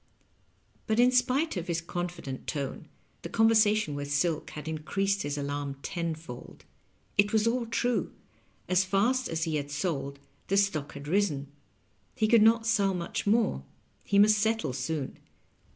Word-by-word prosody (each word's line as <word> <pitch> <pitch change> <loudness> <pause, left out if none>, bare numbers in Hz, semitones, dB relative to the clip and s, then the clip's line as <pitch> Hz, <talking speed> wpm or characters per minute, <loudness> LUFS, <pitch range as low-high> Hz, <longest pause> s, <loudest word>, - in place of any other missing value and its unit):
But, 220 0 +1
in 250 +1 +6
spite 255 +5 +2
of 175 +1 -4
his 170 -1 0
confident 170 -5 -5
tone, 140 -3 -4 0.3
the - - -6
conversation 215 -6 +3
with 145 0 -5
Silk 155 +2 0
had 150 0 -8
increased 195 +6 -1
his 145 0 -3
alarm 145 -1 -3
tenfold. 160 -7 -6 0.5
It 205 +1 +5
was 220 -1 +2
aU 240 +1 +1
true: 240 +1 -1 0.6
as 185 +1 +3
fast 225 +7 +1
as 165 0 -1
he 155 -1 0
had 145 -1 -4
sold, 140 -2 -3 0.3
the 195 - +1
stock 160 -8 0
had 140 +1 -9
risen; 150 -6 0 0.6
he 215 - +2
could 230 0 +6
not 225 +1 +5
sell 200 -4 +2
much 170 +3 -4
more; 215 - +2 0.4
he 200 - +1
must 210 +1 +6
settle 220 - 0
soon. 135 +2 -3
180 Hz, 150 wpm, -29 LUFS, 145-220 Hz, 0.6 s, in